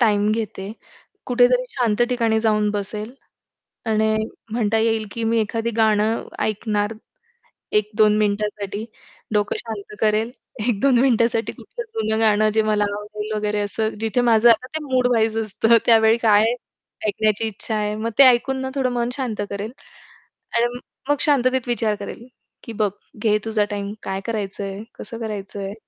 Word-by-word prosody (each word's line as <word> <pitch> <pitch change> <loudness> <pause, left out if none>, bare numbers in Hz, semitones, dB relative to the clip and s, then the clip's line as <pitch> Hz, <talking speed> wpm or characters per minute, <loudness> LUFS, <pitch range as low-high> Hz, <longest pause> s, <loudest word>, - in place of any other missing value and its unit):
Time 210 -2 +3
घेते. 210 -2 -4 0.5
कुठेतरी 250 0 +4
शांत 235 -2 +1
ठिकाणी 230 -3 +1
जाऊन 215 -2 +2
बसेल. 210 +3 -4 0.7
आणि 220 0 +2 0.4
म्हणता 225 -1 +1
येईल 225 -1 +1
की 230 - -3
मी 225 0 +2
एखादं 225 +1 -2
गाणं 220 0 +2 0.2
ऐकणार 210 0 -1 0.9
1-2 210 0 +2
मिनिटासाठी, 210 0 -1 0.5
डोकं 210 -1 +1
शांत 210 -2 -7
करेल, 220 +2 +2 0.4
1-2 245 +3 +3
मिनिटासाठी 235 -3 +2
कुठलं - - -8
जुनं 220 0 0
गाणं 215 -1 +4
जे 220 - +4
मला 215 -1 +2
आवडेल 210 +1 -6
वगैरे 210 0 -1
असं 215 +2 -1
जिथे 225 +2 0
माझं 235 -1 +5
आता 230 +2 +4
ते 315 - 0
मूड 255 -2 +2
वाईज 225 -1 +1
असतं 225 +2 +3
त्यावेळी 225 0 +5
काय 215 -2 +4 0.6
ऐकण्याची 215 +1 +1
इच्छा 220 +1 -2
आहे. 210 0 -1
मग 225 +2 -2
ते 280 - +9
ऐकून 260 +1 +4
ना 265 - -3
थोडं 265 -2 +1
मन 240 0 0
शांत 250 -6 -3
करेल 200 +3 -4 0.9
आणि 240 +1 0 0.3
मग 290 - +4
शांततेत 260 -3 +2
विचार 225 -3 0
करेल, 205 +3 -8 0.4
की 230 - -7
बघ 205 - +1 0.3
घे 210 -1 +4
तुझा 215 -2 +1
टाईम 200 0 -3
काय 190 0 -3
करायचंय, 200 -2 -4 0.2
कसं 230 - -6
करायचंय. 200 -2 -5
220 Hz, 150 wpm, -22 LUFS, 210-235 Hz, 0.9 s, ते